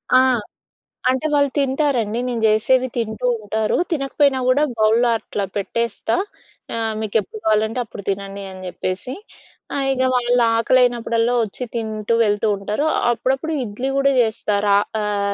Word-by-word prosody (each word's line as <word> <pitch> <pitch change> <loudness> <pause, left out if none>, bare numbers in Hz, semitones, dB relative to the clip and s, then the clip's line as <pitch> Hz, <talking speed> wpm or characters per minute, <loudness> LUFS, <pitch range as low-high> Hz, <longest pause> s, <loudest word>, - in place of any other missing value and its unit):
ఆ! 255 - +8 0.9
అంటే 260 +4 0
వాళ్ళు 285 -1 +3
తింటారండి. 265 -5 0
నేను 240 -2 -2
జేసేవి 250 +4 +3
తింటూ 225 +1 -3
ఉంటారు. 215 +1 -1
తినకపోయినా 275 -2 +1
గూడా 270 +4 +4
బౌల్‌లో 225 +3 +3
అట్లా 200 -1 -4
పెట్టేస్తా. 230 +2 -1 0.6
ఆహ్, 225 -1 -1
మీకెప్పుడు 215 0 -2
కావాలంటే, 220 +2 +1
అప్పుడు 205 - -10
తినండి 195 0 -4
అని 185 0 -10
జేప్పేసి. 185 +8 -4 0.6
ఆ - - 0
ఇగ 260 -1 +1
వాళ్ళు 245 0 +2
ఆకలైనప్పుడల్లా 235 0 +2
వచ్చి 215 +4 -5
తింటూ 220 -1 -2
వెళ్తూ 205 +1 +1
ఉంటారు. 210 +9 -2 0.3
అప్పుడప్పుడు 265 +7 -1
ఇడ్లీ 245 +4 -4
గూడా 275 0 +3
జేస్తా. 220 -2 0
రా 200 0 +5 0.2
ఆహ్, 200 -1 -1
230 Hz, 135 wpm, -20 LUFS, 210-255 Hz, 0.9 s, ఆ